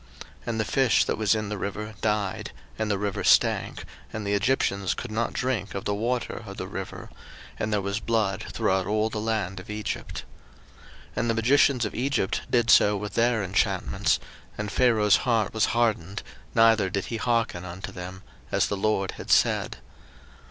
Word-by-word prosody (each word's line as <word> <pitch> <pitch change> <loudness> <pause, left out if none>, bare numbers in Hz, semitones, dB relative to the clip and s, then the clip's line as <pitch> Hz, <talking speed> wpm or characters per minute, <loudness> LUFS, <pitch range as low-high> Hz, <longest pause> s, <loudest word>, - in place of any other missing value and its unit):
02:007:021 - - -10 0.2
And 115 -1 -1
the 110 - +1
fish 130 +1 +3
that - - -1
was 110 0 +3
in 105 -1 -2
the 105 - -3
river 105 +2 -4
died; 105 -3 -1 0.3
and 110 -1 0
the 100 - +1
river 100 -1 -2
stank, - - +3 0.3
and 110 -1 -5
the 100 - 0
Egyptians 100 -4 +1
could 120 - -6
not 115 +2 -1
drink 120 -7 -2
of 100 - -4
the 105 - 0
water 120 +3 -2
of 100 -2 -9
the - - -4
river; 95 0 -7 0.5
and 110 - -1
there 105 -2 +1
was 100 +2 -1
blood 110 -4 0
throughout 95 0 +1
all 110 +1 +1
the 105 - -3
land 105 -4 -2
of 90 - -12
Egypt. 105 0 -4 0.9
02:007:022 - - -25
And 120 - 0
the - - +3
magicians 125 +1 +4
of 105 - -4
Egypt 130 -6 0
did 120 -2 +3
so 105 0 +6
with 105 -1 -5
their 115 -1 +2
enchantments: 95 0 +1 0.4
and 105 0 -3
Pharaoh's 110 -5 +4
heart 115 -5 +1
was 110 -1 +3
hardened, 110 -6 0 0.3
neither 115 -4 +5
did 95 0 -2
he 115 - -3
hearken 115 -6 0
unto 90 +1 -7
them; 90 +1 -8 0.3
as - - +2
the 100 - -1
LORD 95 -1 0
had - - -9
said. - - +3
105 Hz, 185 wpm, -26 LUFS, 100-115 Hz, 0.9 s, so